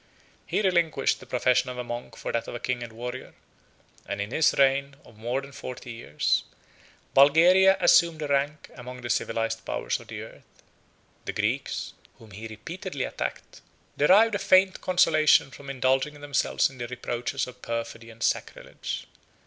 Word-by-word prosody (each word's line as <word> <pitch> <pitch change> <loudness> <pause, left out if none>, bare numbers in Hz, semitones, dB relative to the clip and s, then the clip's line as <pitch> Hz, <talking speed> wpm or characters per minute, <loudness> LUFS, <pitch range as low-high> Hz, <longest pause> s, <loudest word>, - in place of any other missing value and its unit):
He - - 0
relinquished 170 -7 +2
the 130 - -14
profession 125 +1 +2
of 125 - -6
a 125 - -3
monk 120 -1 -7
for - - -4
that 115 - -2
of - - -6
a - - -4
king 125 0 -2
and 120 -1 -7
warrior; 125 +3 -7 0.7
and 100 - -4
in 100 +2 -3
his 160 +4 +4
reign 140 0 +3
of 115 - -17
more 120 +5 -2
than 140 +1 -11
forty 130 -2 -8
years, 115 -10 0 0.7
Bulgaria 180 +7 +6
assumed 170 -2 +4
a - - -2
rank 145 +1 -1
among 125 +1 -9
the 120 -1 -3
civilized 115 0 -1
powers - - -2
of - - -14
the - - -6
earth. - - -16 0.6
The - - -3
Greeks, - - -2 0.2
whom 110 -2 -16
he 105 +3 -8
repeatedly 145 - -6
attacked, - - -5 0.3
derived 205 +9 +5
a 200 - 0
faint 190 -1 +4
consolation 155 -6 +4
from 140 +2 -11
indulging 135 +2 0
themselves 145 -1 +1
in 130 - -15
the 120 - -4
reproaches 120 0 -3
of 125 0 -13
perfidy 115 0 -5
and 115 0 -9
sacrilege. - - -3
130 Hz, 165 wpm, -26 LUFS, 120-155 Hz, 0.7 s, Bulgaria